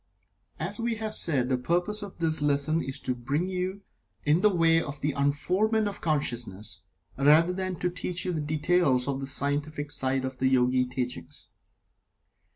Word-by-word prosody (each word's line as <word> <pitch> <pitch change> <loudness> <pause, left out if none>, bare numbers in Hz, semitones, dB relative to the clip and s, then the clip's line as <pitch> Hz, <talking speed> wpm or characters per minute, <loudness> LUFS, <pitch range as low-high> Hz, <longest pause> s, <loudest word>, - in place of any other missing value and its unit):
As - - -3
we 230 0 -1
have 220 -1 -4
said, 135 -11 +1
the 130 -1 0
purpose 175 - 0
of 200 -2 -8
this 160 -2 +1
lesson 145 +2 +1
is 135 0 -3
to 130 - -1
bring 140 +8 -2
you 185 +2 -3 0.4
in 150 +4 +3
the 210 - +6
way 165 -3 +4
of 145 -2 -6
the 150 - +1
unfoldment 185 +11 +1
of 205 - -5
consciousness, 120 - -2 0.4
rather 155 +5 +5
than 185 0 -2
to 180 +1 -1
teach 180 0 -3
you 180 - 0
the 160 -3 -2
details 150 -3 +2
of 135 -1 -1
the 135 - -4
scientific 145 +2 -3
side 130 -1 -1
of 130 0 -6
the 130 - +2
Yogi 125 0 +3
teachings. 125 -9 -4
150 Hz, 170 wpm, -27 LUFS, 135-180 Hz, 0.4 s, the